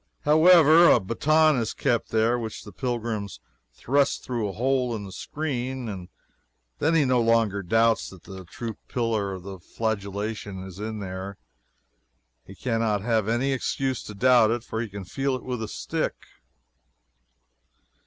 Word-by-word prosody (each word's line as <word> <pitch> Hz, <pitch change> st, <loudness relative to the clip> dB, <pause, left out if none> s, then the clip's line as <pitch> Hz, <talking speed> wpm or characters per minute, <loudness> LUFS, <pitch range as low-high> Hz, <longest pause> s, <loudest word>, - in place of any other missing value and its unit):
However, 160 Hz, +1 st, +7 dB
a -, -, +6 dB
baton 155 Hz, +9 st, +3 dB
is 115 Hz, -2 st, -2 dB
kept 120 Hz, -2 st, 0 dB
here, 115 Hz, +2 st, +2 dB
which 110 Hz, -2 st, -6 dB
the 105 Hz, -, -11 dB
pilgrim 115 Hz, -3 st, -3 dB, 0.4 s
thrusts 140 Hz, -, +1 dB
through 120 Hz, -5 st, -3 dB
a -, -, -6 dB
hole 125 Hz, +1 st, 0 dB
in 105 Hz, -, -5 dB
the 95 Hz, -, -9 dB
screen, 130 Hz, -2 st, -4 dB
and 95 Hz, -4 st, -7 dB, 0.7 s
then 165 Hz, +1 st, +2 dB
he 155 Hz, -3 st, +4 dB
no 125 Hz, -2 st, +3 dB
longer 115 Hz, -3 st, +2 dB
doubts 115 Hz, +5 st, +2 dB
that 95 Hz, -3 st, -14 dB
the 95 Hz, -2 st, -9 dB
true 115 Hz, +5 st, -7 dB
Pillar 115 Hz, -5 st, -1 dB
of 95 Hz, -1 st, -9 dB
Flagellation 105 Hz, -2 st, -4 dB
is 95 Hz, 0 st, -10 dB
in 110 Hz, 0 st, -5 dB
there. 95 Hz, 0 st, -6 dB, 1.1 s
He 95 Hz, -, -13 dB
can 115 Hz, +2 st, -2 dB
not 105 Hz, -3 st, 0 dB
have 110 Hz, -3 st, +1 dB
any 125 Hz, +4 st, +1 dB
excuse 130 Hz, 0 st, -2 dB
to 105 Hz, -, -8 dB
doubt 125 Hz, 0 st, +5 dB
it, 115 Hz, 0 st, -1 dB
for 110 Hz, -1 st, -4 dB
he 115 Hz, -, -4 dB
can 100 Hz, -1 st, -8 dB
feel 135 Hz, +3 st, -1 dB
it 130 Hz, -, -7 dB
with 125 Hz, -2 st, -4 dB
the 110 Hz, -, -4 dB
stick. -, -, -3 dB
115 Hz, 160 wpm, -25 LUFS, 100-130 Hz, 1.1 s, However